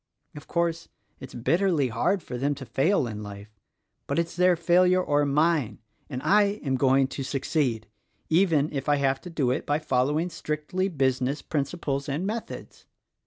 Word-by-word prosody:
Of 150 - -10
course, 170 -1 -1 0.3
it's 130 - -10
bitterly 155 +3 +1
hard 140 - 0
for 125 - -7
them 140 +4 0
to 135 - -9
fail 145 +5 +1
in 105 -3 -6
life 105 0 -10 0.2
— - - -52
but - - -2
it's 170 0 -1
their 180 0 +4
failure 180 +2 +3
or 145 -5 +1
mine: 150 -3 +1 0.3
and 130 -2 -5
I 205 0 +3
am 135 - 0
going 135 +1 +3
to 140 - -6
succeed, 130 -4 -1 0.4
even 160 -4 +2
if 140 +1 -3
I 145 - +5
have 135 -1 0
to 180 - -9
do 145 -7 0
it 130 - -3
by 145 - +2
following 150 +4 0
strictly 160 +4 -2
business 135 -4 0
principles 140 -2 -2
and 150 +7 -2
methods. 220 +3 -6
145 Hz, 170 wpm, -26 LUFS, 130-170 Hz, 0.4 s, I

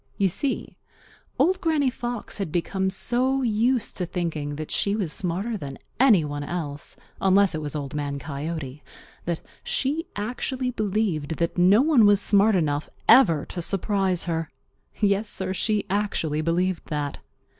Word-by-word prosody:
You 195 -1 +3
see, 260 - -2 0.6
Old 370 +2 +2
Granny 305 -6 +2
Fox 240 -4 -5
had 190 -6 -3
become 190 +3 0
so 255 +7 0
used 235 +1 +1
to 180 - -2
thinking 160 -5 -3
that 155 +1 -6
she 200 0 +1
was 190 -8 -1
smarter 195 +6 -1
than 140 -6 -7 0.2
any 220 - +5
one 145 0 -4
else, 145 -3 -5 0.3
unless 195 0 +4
it 155 - -3
was 150 0 -5
Old 145 -1 -4
Man 145 -1 -2
Coyote, 145 -1 -5 0.4
that 170 -1 -2 0.2
she 305 +5 -1
actually 250 +4 -2
believed 200 -9 -1
that 170 0 -1
no 190 +7 +5
one 280 -9 +5
was 205 -1 +5
smart 205 +1 +4
enough 150 -4 0 0.2
ever 165 - +6
to 175 - -6
surprise 195 0 0
her. 165 -2 -2 0.5
Yes, 205 0 +1
Sir, 190 -2 -3
she 210 +2 0
actually 190 -7 -1
believed 175 +2 0
that. 145 -2 -3
190 Hz, 155 wpm, -25 LUFS, 155-220 Hz, 0.6 s, ever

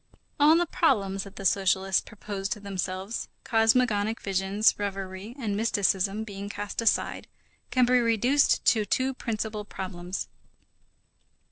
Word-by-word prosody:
All 305 +3 +6
the 350 - +2
problems 195 - +1
that 200 0 -12
the 195 - -8
socialists 190 0 +2
proposed 205 -1 -6
to 215 - -11
themselves, 195 +1 -4 0.2
cosmogonic 225 -2 +2
visions, 195 +2 +2
reverie 195 +2 -5
and 215 -7 -2
mysticism 205 -1 +1
being 200 -1 -7
cast 205 +2 -4
aside, 230 - 0 0.4
can 255 -1 +3
be 250 +1 +4
reduced 240 +4 +2
to 220 -3 +4
two 260 +6 0
principal 220 -3 -4
problems. 185 -2 -6
205 Hz, 125 wpm, -27 LUFS, 195-230 Hz, 0.4 s, All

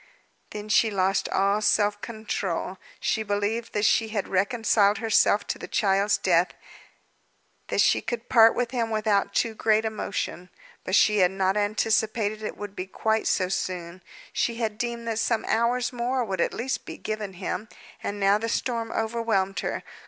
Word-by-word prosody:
Then 210 0 -7
she 220 +1 +4
lost 195 -1 0
all 200 +2 +2
self 205 0 +2
control. 195 -5 -4 0.2
She 220 - 0
believed 205 +2 -2
that 210 0 +1
she 225 - +3
had 210 -2 -3
reconciled 205 +1 +2
herself 210 -1 +3
to - - -4
the - - -7
child's 200 0 +2
death, 175 -1 +2 1.1
that - - +1
she - - +3
could 240 -1 -5
part 225 -2 +6
with 240 -1 -1
him 235 -3 -1
without 210 -2 0
too 230 -2 +1
great 220 0 +2
emotion. 200 -4 -4 0.3
But 185 - 0
she 210 -1 +4
had 180 -1 +5
not 190 0 0
anticipated 215 +1 0
it 215 - -5
would 205 -1 -7
be 185 -1 -5
quite 220 +3 0
so 185 - +1
soon; 180 -1 -4 0.3
she 235 - 0
had 220 -2 -3
deemed 235 -1 -3
that 225 -1 -1
some 225 0 0
hours 240 +2 +1
more 245 +1 -1
would 190 -4 -2
at - - +1
least 260 +3 -3
be - - -7
given 215 -2 -4
him, 185 +3 -4 0.3
and 205 0 -4
now 200 +1 +3
the 230 +1 -3
storm 230 -1 -2
overwhelmed 220 -4 -1
her. - - -3
215 Hz, 170 wpm, -26 LUFS, 195-225 Hz, 1.1 s, part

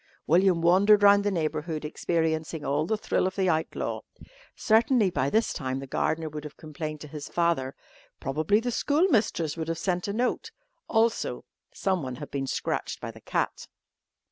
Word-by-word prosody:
William 175 +1 +4
wandered 200 +4 +5
round 200 0 +7
the 205 - +1
neighbourhood 155 -3 -2
experiencing 160 -1 -1
all 150 +3 0
the 220 - 0
thrill 195 - 0
of 190 - -5
the 190 -2 +1
outlaw. 160 -1 -1 0.5
Certainly 220 -2 +3
by 135 -3 0
this 220 +8 +1
time 130 -2 -3
the 135 - -6
gardener 160 +4 -1
would 150 -1 -6
have 150 -1 -9
complained 155 0 -6
to 150 - -8
his 145 0 -8
father, 170 -6 0 0.4
probably 155 +9 +1
the 245 +2 -2
schoolmistress 235 - +1
would 160 -1 -3
have 165 0 -2
sent 180 0 -1
a 200 - -2
note. 245 +3 -1 0.4
Also 225 0 0 0.3
someone 165 -10 -2
had - - -9
been 135 -1 -2
scratched - - -2
by - - -6
the - - -15
cat. - - -2
165 Hz, 170 wpm, -27 LUFS, 150-200 Hz, 0.5 s, round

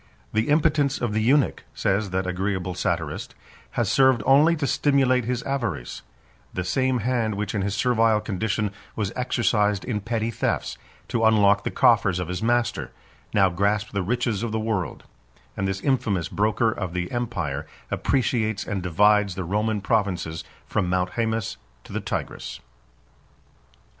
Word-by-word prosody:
"The 110 +4 +1
impotence 150 -2 +2
of 120 -3 -1
the 110 - +1
eunuch," 135 +5 +2
says 100 +1 0
that 95 +1 -1
agreeable 90 0 -2
satirist, - - -3 0.4
"has - - +2
served 130 -5 +4
only 150 +5 +5
to 150 -3 -2
stimulate 130 -2 +2
his 125 0 -2
avarice: 115 - -3 0.5
the 90 - -1
same 130 +6 +1
hand 115 -2 0
which 105 0 -3
in 100 - 0
his 100 +1 -1
servile 115 -1 +3
condition, 105 0 -1 0.2
was 100 -3 -2
exercised 105 -5 +1
in 105 -4 -2
petty 115 +1 -1
thefts, - - -1 0.3
to 115 -2 0
unlock 105 -2 +4
the - - -1
coffers 90 -2 +3
of 90 -1 -3
his 90 0 -3
master, 120 0 0 0.4
now 95 -2 +4
grasps 100 +4 0
the 100 - -1
riches 115 +1 -1
of 115 -1 -2
the 110 - -1
world; 105 - -2 0.5
and 95 - -1
this 95 0 -2
infamous 105 - 0
broker 110 +2 +1
of 95 -5 -4
the 90 -1 -2
empire 85 - -3 0.2
appreciates 110 -5 0
and 100 -4 -3
divides 100 +2 +3
the 95 - -3
Roman 105 +4 0
provinces 90 -7 -1 0.2
from 90 - -1
Mount 90 0 0
Haemus 110 - -1 0.3
to - - -12
the - - -2
Tigris. - - -4
105 Hz, 155 wpm, -24 LUFS, 95-120 Hz, 0.5 s, only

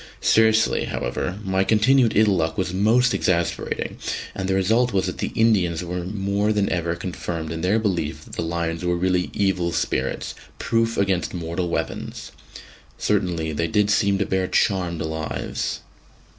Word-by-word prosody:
Seriously, 110 0 +3
however, - - -3
my 95 -1 +1
continued 115 +3 +4
ill 105 -2 +5
luck 80 -2 -1
was 90 -1 -1
most 115 +6 +3
exasperating; 85 -2 -1 0.3
and 95 -1 -3
the 95 - +2
result 110 +5 +2
was 95 -1 +2
that - - -4
the - - -2
Indians 95 -7 +2
were 90 +1 -3
more 100 +2 0
than 105 -2 +1
ever 85 -1 -1
confirmed 85 -2 -5
in 80 0 -4
their 95 +5 +2
belief 85 -8 -1
that - - -15
the - - -3
lions 85 0 -2
were 90 0 +1
really 90 0 +1
evil 95 -4 0
spirits, - - -2 0.2
proof 115 0 0
against 95 -2 0
mortal 85 +1 -3
weapons. - - -4 0.7
Certainly, 90 -6 0
they 85 +3 0
did 105 -2 +2
seem 100 -1 +3
to 100 - 0
bear 95 -1 0
charmed 90 -6 +1
lives. 80 -1 -3
95 Hz, 155 wpm, -23 LUFS, 85-105 Hz, 0.7 s, ill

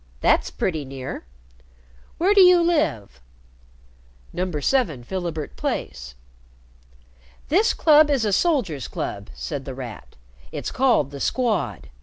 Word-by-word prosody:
That's - - +2
pretty 160 -5 -2
near. 135 - -7 0.9
Where 375 +5 +3
do 400 - +6
you 360 -1 +7
live?" 295 - 0 1.1
"No. 185 +1 -2
7 155 - 0
Philibert 165 0 -5
Place." 60 -2 -4 1.3
"This 400 +9 +3
club 305 -1 +5
is 270 -6 +1
a 205 - 0
soldiers' 195 - 0
club," - - -5
said 60 - -5
The 135 -1 -7
Rat. 125 -4 -9 0.4
"It's - - -5
called 240 - +2
the 140 - -8
Squad. 215 - -1
175 Hz, 120 wpm, -23 LUFS, -, 1.3 s, you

